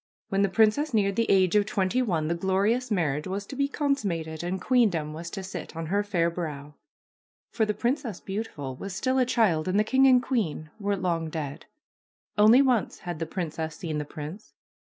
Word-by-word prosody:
When 195 0 +1
the 200 - +3
princess 225 +7 +2
neared 200 -2 +2
the 230 +1 +1
age 190 -1 +4
of 205 0 +4
twenty 205 +4 +1
one 170 -10 0
the 170 - +1
glorious 195 +8 +1
marriage 155 -7 0
was 195 +2 -3
to 270 - -8
be 280 +1 +1
consummated 195 - -2
and 180 +2 -2
queendom 180 - +2
was 170 +2 -6
to 195 +2 -6
sit 185 -4 -7
on 165 0 -4
her 205 - +3
fair 175 -5 +1
brow. 150 -4 -5 0.8
For 220 - +1
the 210 - -1
Princess 240 - -1
Beautiful 190 -10 -5
was 195 +7 -6
still 260 +7 +1
a 255 - +4
child 190 -10 +2
and 190 +3 +2
the - - +4
king 265 +4 +4
and 255 -1 +6
queen 195 - -2
were 200 -1 0
long 170 -3 -1
dead. 150 -3 -5 0.7
Only 220 +6 +7
once 250 -6 0
had 175 -3 -5
the 165 - -3
princess 160 -2 -4
seen 155 -3 -4
the - - -2
prince. 155 +8 -8
190 Hz, 195 wpm, -27 LUFS, 165-225 Hz, 0.8 s, Only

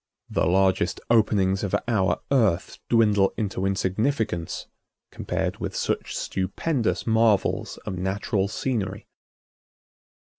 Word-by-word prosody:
The - - +1
largest 95 +1 +2
openings 100 -4 +3
of 100 - 0
our 105 -6 +1
Earth 110 -10 +1
dwindle 105 -4 +3
into 100 -3 -1
insignificance 95 - -1 0.5
compared - - -2
with - - -4
such - - -2
stupendous 110 - -1
marvels 110 -3 +2
of 90 - -4
natural 95 +1 -1
scenery. 105 -3 -3
100 Hz, 100 wpm, -25 LUFS, 95-115 Hz, 0.5 s, openings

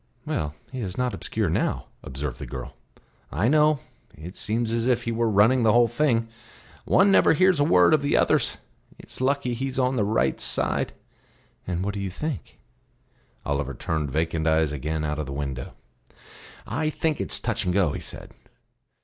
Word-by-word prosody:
"Well, 75 -1 -2 0.2
he 130 - -5
is 95 -5 -4
not 125 -1 0
obscure - - -2
now," - - -1 0.2
observed 65 -1 -5
the - - -6
girl. - - -7 0.6
"I 90 +10 +1
know; 150 0 +4 0.3
it 85 +5 -9
seems 115 +1 -1
as 115 +1 0
if 125 -2 +2
he 115 - -2
were 115 0 +1
running 110 +5 +4
the 110 -2 +4
whole 120 0 +5
thing. 120 -2 +1 0.6
One 195 +1 +5
never 195 - +5
hears 185 0 +4
a - - +5
word 90 - +5
of 155 - +4
the 145 - +2
others. - - +2 0.4
It's - - -10
lucky 135 -1 +1
he's 130 +2 -3
on 130 0 +1
the 110 - +2
right 105 +2 +1
side." - - 0 0.7
"And 90 +1 -2
what 100 - -2
do 100 - -4
you 100 -1 -3
think?" 150 - -5 0.9
Oliver 70 -2 -2
turned 75 0 -2
vacant 80 +2 -1
eyes 80 -1 +3
again 75 +2 -3
out 75 0 -2
of 75 - -3
the 70 - -5
window. 70 -2 -5 0.9
"I 155 +7 -1
think 155 0 -1
it - - -4
is - - -1
touch - - -1
and 90 - +1
go," 90 -4 +2
he - - -5
said. - - -8
110 Hz, 185 wpm, -25 LUFS, 80-130 Hz, 0.9 s, whole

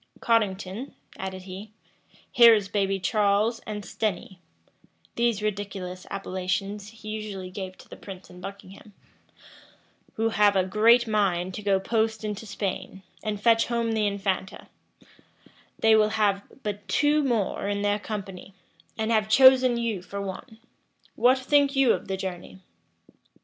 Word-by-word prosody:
"Cottington," 210 +1 -1 0.2
added 190 -1 -6
he, 195 +3 -9 0.6
"here 235 -2 +8
is 200 -2 -2
baby 195 -1 0
Charles 210 +3 +1
and 210 -1 -5
Stenny," 190 -1 -4 0.8
(these 235 -3 0
ridiculous 195 -3 -4
appellations 195 +1 -3
he 215 0 -11
usually 205 -4 -6
gave 185 -1 -7
to - - -16
the - - -10
prince 190 -1 -11
and 180 0 -14
Buckingham,) 200 +1 -10 1.2
"who 225 +1 +1
have 210 -2 +3
a 190 - +3
great 225 +5 +4
mind 190 -4 0
to 210 - -6
go 200 -2 +2
post 220 +2 -1
into 210 +1 -5
Spain, 195 -1 -5 0.2
and 210 -2 -3
fetch 225 +1 +3
home 235 -1 -1
the 215 -2 +1
infanta: 195 -2 -3 1.1
they 220 0 +5
will 215 -1 +4
have 210 -2 +1 0.2
but 205 -1 -5
two 295 +1 +2
more 230 -7 -1
in 200 0 -1
their 205 0 +1
company, 195 -3 -7 0.4
and 220 +1 -1
have 215 -1 +2
chosen 260 0 +6
you 230 -5 -2
for 195 +3 -7
one. 200 +4 -7 0.6
What 255 +2 +4
think 280 +1 +2
you 270 -3 +5
of - - -5
the 190 0 -2
journey?" 180 - -6
205 Hz, 145 wpm, -26 LUFS, 195-225 Hz, 1.2 s, here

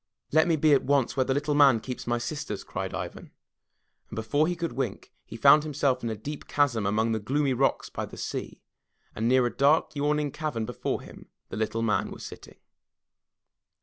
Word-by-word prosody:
"Let 160 +3 +4
me 165 - +3
be 155 0 +4
at 140 - +5
once 140 -2 +1
where 130 - +2
the 130 - +1
Little 150 +1 0
Man 140 -5 +6
keeps 125 +2 -7
my 120 0 +1
sisters," 120 -3 -4
cried - - -5
Ivan, - - -6 0.8
and - - -8
before 115 +8 +1
he 175 - -1
could 170 -1 -3
wink, 125 -7 -4 0.2
he 115 - -8
found 140 +5 +7
himself 140 -4 0
in 115 - -2
a 110 - -2
deep 145 +8 -7
chasm 120 -8 +1
amongst 110 +3 +1
the 110 - 0
gloomy 135 +5 0
rocks 135 +2 0
by - - -4
the - - -12
sea, - - -5 0.5
and 110 +2 -1
near 130 0 +4
a 120 - -2
dark 150 +2 +3
yawning 150 0 0
cavern 150 -8 -3
before 120 -1 -3
him - - -13 0.2
the - - -6
Little 110 +1 -1
Man 105 -4 +1
was - - -9
sitting. - - -11
135 Hz, 200 wpm, -27 LUFS, 115-150 Hz, 0.8 s, found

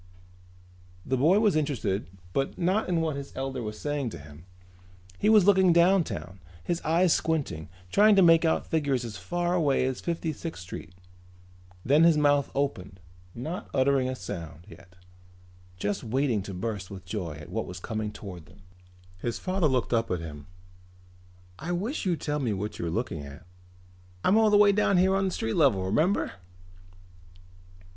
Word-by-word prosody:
The 130 - 0
boy 160 +10 +4
was 210 -4 +3
interested 130 -10 -1 0.3
but 135 0 -1
not 185 +4 0
in 170 -2 +1
what 160 -3 -1
his 140 0 -7
elder 135 -1 -3
was 105 -1 -5
saying 145 -4 -2
to 85 - -8
him. 75 +2 -13 0.7
He 210 - +2
was 215 -4 +6
looking 190 -2 +5
downtown, 170 - +2 0.2
his 175 -1 -2
eyes 165 +2 +3
squinting, 140 - -2 0.2
trying 210 0 +6
to 195 - +6
make 165 -1 +6
out 160 - +1
figures 140 -6 0
as 105 -5 -7
far 175 - -2
away 145 -7 +2
as 130 -1 -3
Fifty 165 -2 -2
sixth 160 - -7
Street. 90 +1 -9 0.9
Then 145 +5 +5
his 165 -2 +5
mouth 145 -2 +3
opened, 100 -10 -2 0.4
not 155 +10 -5
uttering 135 -1 +2
a 130 - -3
sound 85 - -8
yet, 90 +2 -15 0.8
just 100 +3 -2
waiting 125 -2 0
to 100 - -7
burst 100 -1 -4
with 95 -2 -9
joy 90 -4 -4
at 75 0 -11
what - - -3
was 90 0 -7
coming 110 +2 -4
toward 90 -7 -10
them. 90 +1 -19 0.6
His 120 +4 -3
father 185 -3 0
looked 130 -3 0
up 115 -1 +1
at 90 - -1
him. 75 -3 -9 1.1
"I 170 +5 -3
wish 205 - -2
you'd 175 -3 0
tell 150 0 -1
me 120 -6 -1
what 105 +2 -5
you 85 - -2
are - - -1
looking 80 - -3
at. 70 +1 -11 0.8
I'm 190 - +4
all 220 -1 +5
the 210 - +5
way 205 0 +6
down 200 -1 +2
here 190 +2 +4
on 195 0 +1
street 115 -10 -2
level, 120 - +3
remember?" 155 - +1
135 Hz, 170 wpm, -27 LUFS, -, 1.1 s, was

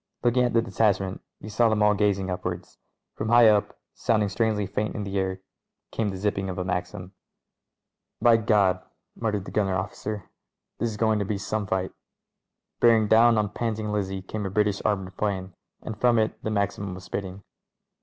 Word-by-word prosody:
Looking 125 +1 +3
at 120 - -1
the 115 -1 +3
detachment, 100 -5 0 0.2
he - - -10
saw 115 +2 +2
them 110 -1 +2
all 105 0 +5
gazing 100 -2 +1
upwards. 90 0 -5 0.3
From 110 - -4
high 120 0 +7
up, 105 -1 +1 0.2
sounding 110 -3 +1
strangely 105 0 0
faint 105 +2 -3
in 105 - -3
the 100 0 -2
air, 95 0 -2 0.5
came 110 -2 -1
the 95 - -5
zipping 100 -1 -1
of 90 - -5
a 90 - -1
Maxim. 90 +1 -4 1.1
"By 115 -1 +5
Gad 100 -4 +2 0.2
!" - - -55
muttered 105 -4 -1
the - - -8
gunner 100 -3 +1
officer; 100 +2 -5 0.5
"this 115 - 0
is 105 - -6
go 110 0 +2
ing 105 - 0
to 100 - -1
be 100 +1 -2
some 105 +1 -3
fight." 95 0 -1 0.9
Bearing 115 -2 +5
down 115 +1 +5
on 105 -1 +1
Panting 110 -1 -3
Lizzie 95 -2 -2
came 105 +2 -5
a 95 - -2
British 105 0 +1
ar 105 - +3
moured 95 -1 -9
'plane, 95 -3 -2 0.3
and 110 - -5
from 120 -1 +4
it 110 -1 +1
the - - -3
Maxim 100 -2 -2
was 95 - -10
spitting. 95 0 -6
105 Hz, 195 wpm, -26 LUFS, 95-110 Hz, 1.1 s, high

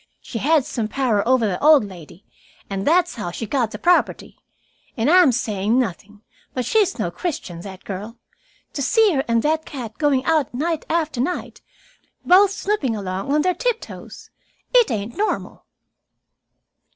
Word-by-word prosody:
"She 230 - -6
had 300 +2 +3
some 225 -3 -3
power 230 -3 0
over 255 -2 +3
the 195 +1 -2
old 300 -6 +6
lady, 180 -1 -13 0.5
and 195 0 -3
that's 350 +2 +3
how 205 -6 -5
she 200 +6 -5
got 240 0 0
the - - -7
property. 355 0 +1 0.6
And 240 +6 +2
I 365 +1 +7
am 310 -7 +5
saying 215 -2 0
nothing, 210 -2 -3 0.3
but 250 -2 -1
she's 400 - +2
no 180 -7 -2
Christian, 175 - -5
that 190 0 -10
girl. 210 +4 -7 0.6
To 280 - -4
see 435 - +3
her 270 -2 0
and 230 -1 +1
that 315 +1 +1
cat 240 -8 -8
going 280 -4 +2
out 310 -6 +1
night 320 +4 -2
after 315 -6 0
night, 350 +7 -4 0.6
both 385 +3 +6
snooping 390 - -1
along 195 +3 -4
on 300 +1 +2
their 365 - +2
tiptoes - - -5 0.4
it - - +5
ain't 220 0 -4
normal." 425 +2 -3
260 Hz, 165 wpm, -21 LUFS, 210-325 Hz, 0.6 s, I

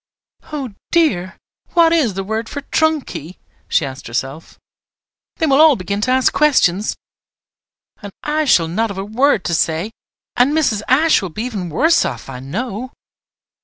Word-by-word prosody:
"Oh 275 -7 -5 0.2
dear! 200 - +1 0.4
what 335 -1 +5
is 265 - +1
the 195 - -3
word 220 +3 -3
for 285 - -5
trunk 315 0 +1
key?" 165 +1 -8 0.3
she 160 - +1
asked 135 0 -8
herself. 135 +6 -5 0.8
"They 325 - 0
will 280 -1 +4
all 315 -3 +7
begin 200 +1 -3
to 230 - 0
ask 260 0 +3
questions, 215 -10 +2 1.1
and 205 -2 -8
I 305 +1 0
shall 170 - +4
not 220 +7 -1
have 200 - -7
a 195 - -4
word 225 0 +2
to 170 - -1
say; 165 +5 0 0.4
and 255 +4 +3
Mrs. 255 -10 +1
Ashe 305 +3 +4
will 190 - -4
be 210 +7 -5
even 205 -8 -4
worse 315 - +3
off, 120 0 -5
I 125 -2 -7
know." 220 - -5
220 Hz, 165 wpm, -18 LUFS, 180-285 Hz, 1.1 s, all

